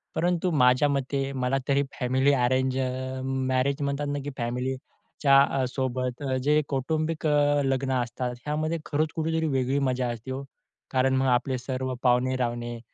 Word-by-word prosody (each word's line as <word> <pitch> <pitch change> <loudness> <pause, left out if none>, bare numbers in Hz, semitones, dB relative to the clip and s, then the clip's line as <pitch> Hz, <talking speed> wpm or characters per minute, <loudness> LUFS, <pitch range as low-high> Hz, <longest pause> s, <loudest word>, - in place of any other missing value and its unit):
परंतु 175 +2 +1
माझ्या 130 -1 +4
मते 135 0 -1
मला 130 0 0
तरी 140 0 +3 0.2
फॅमिली 130 +3 +2
अरेंज 130 0 +1
अ, 130 0 -3
मॅरेज 130 +2 0
म्हणतात 140 +1 -1
ना, 145 - -2
की 145 - -4
फॅमिलीच्या 130 +3 0 0.2
अ, - - +1
सोबत 130 0 -2 0.2
जे 150 +1 +4
कौटुंबिक 155 +4 -1
अ, 145 -1 +3
लग्न 135 0 0
असतात, 125 +1 -3
ह्यामध्ये 155 +2 -1
खरंच 155 +1 0
कुठेतरी 160 0 0
वेगळी 135 -1 +1
मजा 125 -1 -1
असती 120 +3 -7
ओ. 135 +1 -4 0.5
कारण 130 0 +2
मग 130 0 +2
आपले 130 +1 +1
सर्व 130 +1 -3
पाहुणे-रावणे 120 -2 0
130 Hz, 150 wpm, -26 LUFS, 130-145 Hz, 0.5 s, माझ्या